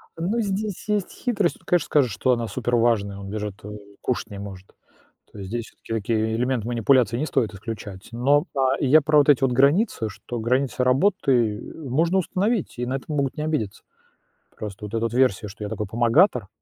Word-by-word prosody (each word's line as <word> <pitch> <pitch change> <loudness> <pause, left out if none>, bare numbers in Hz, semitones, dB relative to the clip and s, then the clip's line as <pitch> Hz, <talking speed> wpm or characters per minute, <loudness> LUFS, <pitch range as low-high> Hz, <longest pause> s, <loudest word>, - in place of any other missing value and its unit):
Ну 180 +8 -1
здесь 205 -1 -3
есть 210 -3 0
хитрость, 210 -8 -1
тут - - -23
конечно, 175 -3 +2
скажешь, 135 -6 +2
что 95 +7 +1
она 120 -2 0
супер 120 +1 -1
важная, 110 -4 +1
он 100 0 -8
даже 105 0 -3 0.2
вот 105 +1 -8 0.2
кушать 125 - -2
не 100 - -7
может, 95 -2 -9 0.6
то - - -13
есть 95 -2 -7
здесь 115 +1 -3 0.2
всё-таки - - -6 0.2
такие 110 0 0
элементы 120 -1 -1
манипуляции 120 -1 +3
не 150 - -1
стоит 115 -8 0
исключать, 100 -2 -8
но, 140 +5 +2
а, 135 0 +2
я 145 +4 +5
про 150 +1 +3
вот 145 - +3
эти 140 -3 +5
вот 135 - +3
границы, 140 - +2
что 120 +4 -7
границы 125 +3 0
работы, 130 - +2
э, 150 -5 -9
можно 165 +8 +2
установить 195 - -1
и 125 - -1
на 130 +2 -2
это 135 - -6
могут 140 -3 -1
не 150 - -2
обидеться. 150 -11 -2 0.7
Просто 105 0 -7
вот - - -16
эта 115 0 -1
версия, 125 -6 +2
что 105 +2 -9
я 105 - -4
такой 105 - -3
помогатор, 120 - +3
125 Hz, 200 wpm, -24 LUFS, 110-150 Hz, 0.7 s, я